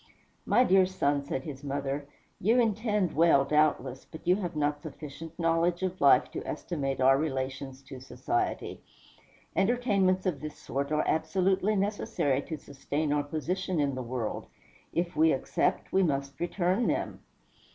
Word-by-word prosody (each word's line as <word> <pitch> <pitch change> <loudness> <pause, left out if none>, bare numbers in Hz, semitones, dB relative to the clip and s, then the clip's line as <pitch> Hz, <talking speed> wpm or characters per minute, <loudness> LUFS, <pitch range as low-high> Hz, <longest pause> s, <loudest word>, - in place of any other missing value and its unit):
"My 250 - +5
dear 190 -5 +5
son," 145 -6 0
said 135 -1 -3
his 145 -3 -8
mother, 140 0 -3 0.3
"you 225 +6 +3
intend 210 -4 +1
well, 160 -4 +5
doubtless; 140 -3 +1
but 160 - -12
you 180 +2 +4
have 175 -5 -4
not 145 -1 0
sufficient 155 +1 -9
knowledge 170 +1 +1
of 185 0 -3
life 140 -3 +5
to - - -5
estimate 140 -5 -3
our 135 +1 +5
relations 135 -2 -3
to 135 -1 -10
society. 355 - -3 0.7
Entertainments 195 -4 +2
of 175 -7 -1
this 155 0 -7
sort 140 +2 -3
are 155 0 +1
absolutely 190 +6 +1
necessary 195 -9 0
to 160 +2 -6
sustain 145 +1 -3
our 145 - +2
position 170 +4 -2
in 140 -2 +1
the 130 - -4
world. 120 -2 -4 0.4
If 175 +1 -2
we 160 +1 +5
accept, 130 - -1
we 190 - +4
must 140 -5 -1
return 180 +5 0
them." - - -1
155 Hz, 150 wpm, -29 LUFS, 140-185 Hz, 0.7 s, My